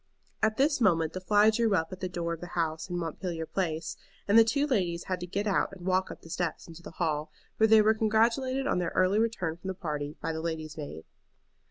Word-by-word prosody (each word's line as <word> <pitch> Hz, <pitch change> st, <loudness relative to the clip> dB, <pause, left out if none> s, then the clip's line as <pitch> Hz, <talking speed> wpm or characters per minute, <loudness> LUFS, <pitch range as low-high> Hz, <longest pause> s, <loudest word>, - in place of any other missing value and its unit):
At 220 Hz, 0 st, +2 dB
this 285 Hz, 0 st, +2 dB
moment 165 Hz, -6 st, +3 dB
the 185 Hz, -, -5 dB
fly 210 Hz, +3 st, +5 dB
drew 220 Hz, -2 st, +2 dB
up 165 Hz, -1 st, -1 dB
at 185 Hz, -, -8 dB
the 185 Hz, -, -3 dB
door 170 Hz, -1 st, -2 dB
of 165 Hz, -, -8 dB
the 175 Hz, -, -6 dB
house 160 Hz, 0 st, -1 dB
in 175 Hz, -, -2 dB
Montpelier 165 Hz, 0 st, -4 dB
Place, 165 Hz, -3 st, -3 dB, 0.3 s
and 205 Hz, -, +3 dB
the 230 Hz, -, +9 dB
two 280 Hz, +6 st, +1 dB
ladies 180 Hz, -, 0 dB
had 185 Hz, -2 st, -3 dB
to 180 Hz, -, -6 dB
get 200 Hz, +4 st, -2 dB
out 200 Hz, -, +1 dB
and 180 Hz, -2 st, -10 dB
walk 185 Hz, 0 st, +1 dB
up -, -, -9 dB
the 165 Hz, -, -12 dB
steps 175 Hz, -2 st, -3 dB
into 165 Hz, 0 st, -11 dB
the -, -, -9 dB
hall, 155 Hz, -3 st, -1 dB, 0.3 s
where 220 Hz, -, +5 dB
they 220 Hz, -1 st, +7 dB
were 215 Hz, +1 st, +5 dB
congratulated 230 Hz, +5 st, +1 dB
on 230 Hz, -, +1 dB
their 175 Hz, -2 st, -1 dB
early 185 Hz, +3 st, +3 dB
return 195 Hz, -8 st, -1 dB
from 185 Hz, -, -9 dB
the 190 Hz, -, -3 dB
party 150 Hz, -5 st, -4 dB
by -, -, -2 dB
the 160 Hz, -, -4 dB
lady's 160 Hz, -2 st, -4 dB
maid. 145 Hz, -, -7 dB
185 Hz, 240 wpm, -29 LUFS, 165-215 Hz, 0.3 s, the